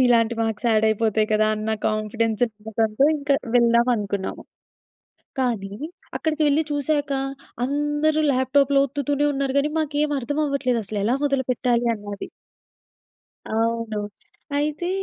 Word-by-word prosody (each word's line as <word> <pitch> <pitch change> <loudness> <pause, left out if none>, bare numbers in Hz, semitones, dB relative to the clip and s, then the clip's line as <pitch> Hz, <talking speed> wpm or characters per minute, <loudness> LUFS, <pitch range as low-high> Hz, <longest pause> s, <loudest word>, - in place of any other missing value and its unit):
ఇలాంటి 235 -1 +3
మార్క్స్ 225 0 -1
ఆడయిపోతాయి 220 0 +2
కదా! 215 0 +3
అన్న 215 +1 -3 0.2
కాన్ఫిడెన్స్ 215 +1 0
ఉండటంతో 220 +3 0
ఇంక 285 0 -6 0.3
వెళ్దాం 235 0 +4
అనుకున్నాము. 200 -2 -3 1.0
కానీ 220 -6 -1 0.4
అక్కడికెళ్లి 310 -1 +1
చూసాక 290 0 0 0.5
అందరూ 295 +2 +1
ల్యాప్‌ట్యాప్‌లో 275 +2 +3
ఒత్తుతూనే 285 +1 0
ఉన్నారు 275 -1 -1
గానీ 295 +2 +1
మాకేమి 295 -1 0
అర్థం 290 +5 -2
అవ్వట్లేదు 270 -4 0
అసలెలా 210 +3 0
మొదలుపెట్టాలి 250 -3 0
అన్నాది. 205 -1 -7 1.2
అవును. 225 -1 0 0.6
అయితే 305 +4 -1
245 Hz, 105 wpm, -23 LUFS, 220-285 Hz, 1.2 s, వెళ్దాం